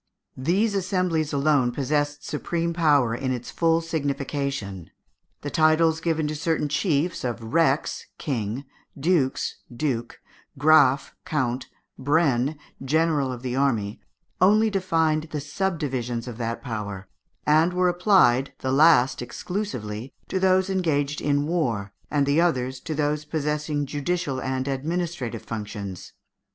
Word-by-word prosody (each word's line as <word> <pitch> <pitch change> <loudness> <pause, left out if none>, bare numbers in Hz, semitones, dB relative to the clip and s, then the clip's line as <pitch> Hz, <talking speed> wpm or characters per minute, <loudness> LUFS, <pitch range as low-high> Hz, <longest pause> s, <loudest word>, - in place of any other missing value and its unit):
These 190 +11 +1
assemblies 180 -5 0
alone 140 -3 +2
possessed 145 +2 -1
supreme 170 +2 -2
power 145 -8 +3
in 130 +2 -2
its 125 -1 -4
full 165 0 +2
signification. 140 - -3 0.5
The 145 - -5
titles 160 0 +3
given 160 -2 0
to 150 - -2
certain 155 0 0
chiefs 155 +2 0
of 115 -2 -4
rex 160 -4 +1
(king), 125 -3 -3 0.3
dux 150 -3 +1
(duke), 120 -2 -3 0.4
graff 145 -2 +4
(count), 130 -4 -1 0.3
brenn 145 -1 +2 0.3
(general 150 -1 +1
of 125 0 -7
the 125 -1 -2
army), 115 -7 0 0.4
only 215 +4 +5
defined 160 -5 +1
the 150 - -3
subdivisions 140 -7 -2
of 120 -1 -7
that 115 0 -3
power, 105 -6 -5 0.4
and 155 +3 +4
were 180 0 +2
applied, 175 - +4
the 130 - -2
last 140 -3 +5
exclusively, 125 - -5
to 190 - 0
those 190 0 +3
engaged 150 -7 0
in 145 0 +1
war, 120 - -1 0.2
and 145 -1 +2
the 140 +4 +3
others 130 -6 0
to 155 +3 -5
those 150 0 0
possessing 150 -1 -2
judicial 145 -1 -2
and 130 0 -2
administrative 140 -4 -3
functions. 105 -4 -6
145 Hz, 125 wpm, -25 LUFS, 130-165 Hz, 0.5 s, only